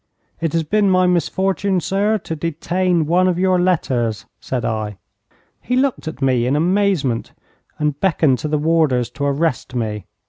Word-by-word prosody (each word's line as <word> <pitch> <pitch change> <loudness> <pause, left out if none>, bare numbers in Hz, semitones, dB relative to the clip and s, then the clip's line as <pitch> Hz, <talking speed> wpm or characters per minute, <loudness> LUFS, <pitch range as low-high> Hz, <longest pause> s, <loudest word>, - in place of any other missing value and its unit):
'It 165 -2 -1
has 165 -1 +1
been 205 +5 +2
my 185 -1 +4
misfortune, 190 +2 +1
sir, 205 +4 +1
to 165 -4 -6
detain 170 +2 0
one 180 +4 +3
of 180 -2 +1
your 185 0 +2
letters,' 130 - 0
said 125 -3 -3
I. 110 -3 -3 0.6
He 250 - -1
looked 260 -8 0
at 145 -3 -5
me 125 -2 +2
in 135 - +1
amazement, 170 - +1 0.4
and 150 -2 -1
beckoned 155 -8 +2
to - - -3
the 150 0 0
warders 150 -6 +1
to 140 0 -3
arrest 140 -2 -1
me. 105 -5 -3
160 Hz, 165 wpm, -19 LUFS, 135-185 Hz, 0.6 s, my